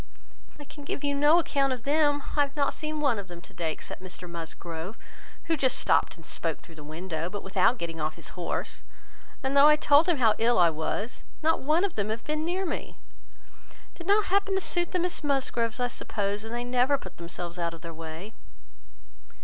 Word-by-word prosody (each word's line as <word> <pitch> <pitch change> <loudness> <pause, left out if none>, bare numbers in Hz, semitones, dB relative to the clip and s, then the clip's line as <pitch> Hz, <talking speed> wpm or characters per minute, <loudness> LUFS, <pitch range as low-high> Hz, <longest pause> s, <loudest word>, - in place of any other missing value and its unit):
"I 295 - -9
can 290 0 -12
give 285 - -4
you 285 0 +1
no 295 +3 +5
account 275 -5 +1
of 245 -3 -7
them. 290 0 +2
I 295 - +4
have 285 0 0
not 285 -2 +1
seen 310 0 -3
one 275 -8 +2
of 195 - -7
them 175 -1 -9
to - - -14
day, 165 -2 -2
except 155 - -8
Mr 180 -1 -7
Musgrove, 170 +2 -5 0.5
who 330 - +1
just 265 -4 +2
stopped - - +3
and 165 -3 -13
spoke 165 0 -2
through 165 - -15
the 155 -2 -11
window, 160 +2 -4
but 205 +1 -6
without 195 +5 +3
getting 165 -4 -5
off 155 +1 -1
his - - -7
horse; 175 -2 -4 0.6
and 265 +1 0
though 280 +1 +8
I 300 - +7
told 300 +3 +5
him 340 - +3
how 225 -4 +5
ill 235 +1 +3
I 170 -2 +6
was, 160 +9 -3 0.2
not 320 +1 +3
one 310 +6 +2
of 400 -4 0
them 205 0 -2
have 225 +1 -3
been 305 0 -2
near 365 +4 -1
me. 330 - -4 0.7
It - - -21 0.2
did 340 - -8
not 405 -1 +3
happen 400 0 +2
to 385 - +1
suit 350 -1 +2
the 365 - +1
Miss 355 -2 0
Musgroves, 260 -5 0
I 245 - +2
suppose, 205 -4 -2
and 225 - -7
they 240 +1 -2
never 250 +3 +2
put - - -11
themselves 170 +1 -5
out 170 -1 -1
of 165 - -15
their 165 -1 -7
way." 165 +6 -8
245 Hz, 220 wpm, -28 LUFS, -, 0.7 s, though